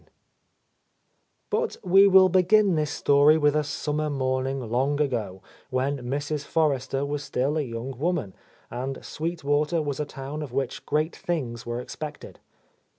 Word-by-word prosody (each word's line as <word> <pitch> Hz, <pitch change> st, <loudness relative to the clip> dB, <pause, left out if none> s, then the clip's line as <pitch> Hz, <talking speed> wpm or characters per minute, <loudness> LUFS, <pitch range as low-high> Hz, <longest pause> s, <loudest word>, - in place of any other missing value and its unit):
II -, -, -30 dB, 1.4 s
B 430 Hz, -, +2 dB
ut 470 Hz, -1 st, -3 dB
we 195 Hz, +2 st, +6 dB
will 190 Hz, -1 st, +7 dB
begin 190 Hz, +2 st, +4 dB
this 155 Hz, -2 st, 0 dB
story 145 Hz, +2 st, +4 dB
with 150 Hz, -1 st, +3 dB
a 150 Hz, -, +2 dB
summer 150 Hz, +1 st, -2 dB
morning 130 Hz, -1 st, -1 dB
long 130 Hz, +4 st, 0 dB
ago, 110 Hz, -10 st, -2 dB, 0.3 s
when 135 Hz, +2 st, -1 dB
Mrs. 145 Hz, +4 st, -3 dB
Forrester 140 Hz, -3 st, 0 dB
was 145 Hz, 0 st, -3 dB
still 140 Hz, +1 st, -1 dB
a 155 Hz, -, +1 dB
young 125 Hz, 0 st, -5 dB
woman, 155 Hz, -, -1 dB, 0.4 s
and 130 Hz, +2 st, -5 dB
Sweet 165 Hz, +1 st, -4 dB
Water 150 Hz, +4 st, +1 dB
was 145 Hz, -3 st, -3 dB
a 150 Hz, -, -1 dB
town 140 Hz, +2 st, -7 dB
of 145 Hz, -5 st, -6 dB
which 135 Hz, -1 st, -3 dB
great 155 Hz, +2 st, 0 dB
things 120 Hz, -10 st, -4 dB
were 120 Hz, 0 st, -2 dB
expected. 150 Hz, +4 st, -8 dB
145 Hz, 155 wpm, -26 LUFS, 130-155 Hz, 1.4 s, will